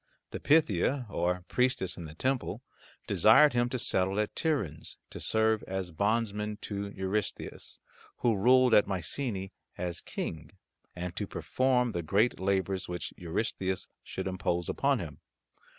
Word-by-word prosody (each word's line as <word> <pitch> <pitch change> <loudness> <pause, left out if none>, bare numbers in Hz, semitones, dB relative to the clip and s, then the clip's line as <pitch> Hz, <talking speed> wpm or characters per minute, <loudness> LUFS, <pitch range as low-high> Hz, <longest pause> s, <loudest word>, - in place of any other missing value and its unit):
The - - -5
Pythia, 140 - +2
or 90 0 -1
priestess 125 -7 +1
in 85 - -7
the 75 0 -10
temple, 130 +7 -1 0.4
desired 150 -3 +6
him 120 0 +2
to 130 - -2
settle 95 -3 +2
at 105 - -1
Tiryns, 120 - -2
to - - -7
serve 110 0 +2
as 95 -2 -3
bondman 105 +3 0
to 100 -1 -4
Eurystheus, 100 +1 -3 0.4
who 120 -3 +2
ruled 125 +4 +5
at 105 - +6
Mycenae 95 - -2 0.3
as 90 -1 -3
King, 80 0 -5 0.4
and 90 0 -5
to - - -2
perform 125 -2 +1
the 85 - -2
great 100 +9 +2
labours 95 0 0
which 90 -1 -5
Eurystheus 95 +1 -2 0.2
should - - -5
impose 90 -2 -1
upon 140 -1 +1
him. 75 -8 -7
100 Hz, 140 wpm, -30 LUFS, 90-120 Hz, 0.4 s, desired